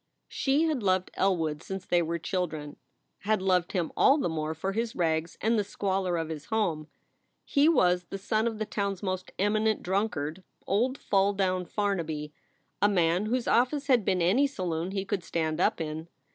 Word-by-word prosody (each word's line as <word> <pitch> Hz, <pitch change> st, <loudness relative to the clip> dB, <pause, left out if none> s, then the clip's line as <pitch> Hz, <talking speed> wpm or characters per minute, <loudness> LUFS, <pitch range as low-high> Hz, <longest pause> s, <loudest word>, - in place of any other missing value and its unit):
She 280 Hz, +3 st, +1 dB
had 310 Hz, -6 st, 0 dB
loved 185 Hz, -2 st, +1 dB
Elwood 160 Hz, -6 st, 0 dB
since 190 Hz, 0 st, -6 dB
they 175 Hz, -1 st, +2 dB
were 170 Hz, 0 st, -1 dB
children 155 Hz, -4 st, -3 dB, 0.4 s
had 215 Hz, +1 st, +1 dB
loved 185 Hz, -2 st, +1 dB
him 175 Hz, -4 st, -1 dB
all 275 Hz, -, +5 dB
the 280 Hz, -, 0 dB
more 155 Hz, 0 st, -2 dB
for 190 Hz, +5 st, -2 dB
his 230 Hz, +2 st, -2 dB
rags 165 Hz, -1 st, 0 dB
and 225 Hz, +1 st, +2 dB
the -, -, +1 dB
squalor 190 Hz, -3 st, -1 dB
of 165 Hz, -1 st, -3 dB
his 155 Hz, -2 st, -6 dB
home. 175 Hz, -9 st, -1 dB, 0.6 s
He 285 Hz, +3 st, +4 dB
was 180 Hz, -, +3 dB
the 195 Hz, -, -6 dB
son 215 Hz, +3 st, 0 dB
of 225 Hz, -2 st, -3 dB
the 215 Hz, -, -2 dB
town 200 Hz, -1 st, -1 dB
s 195 Hz, -, -13 dB
most 185 Hz, -1 st, -3 dB
eminent 215 Hz, +2 st, +1 dB
drunkard, 185 Hz, -4 st, -1 dB, 0.2 s
old 245 Hz, +7 st, +1 dB
"Fall 200 Hz, -4 st, +2 dB
down 185 Hz, -2 st, 0 dB
Farnaby," 160 Hz, -8 st, -2 dB, 0.5 s
a 205 Hz, -, +5 dB
man 180 Hz, +1 st, +2 dB
whose 245 Hz, +2 st, -1 dB
office 275 Hz, +4 st, +2 dB
had 255 Hz, -6 st, +4 dB
been 185 Hz, -2 st, +1 dB
any 235 Hz, +12 st, +4 dB
saloon 180 Hz, -, -3 dB
he 195 Hz, 0 st, -3 dB
could 200 Hz, -2 st, -2 dB
stand 160 Hz, 0 st, -1 dB
up -, -, +2 dB
in. 160 Hz, 0 st, -4 dB
190 Hz, 185 wpm, -28 LUFS, 165-215 Hz, 0.6 s, all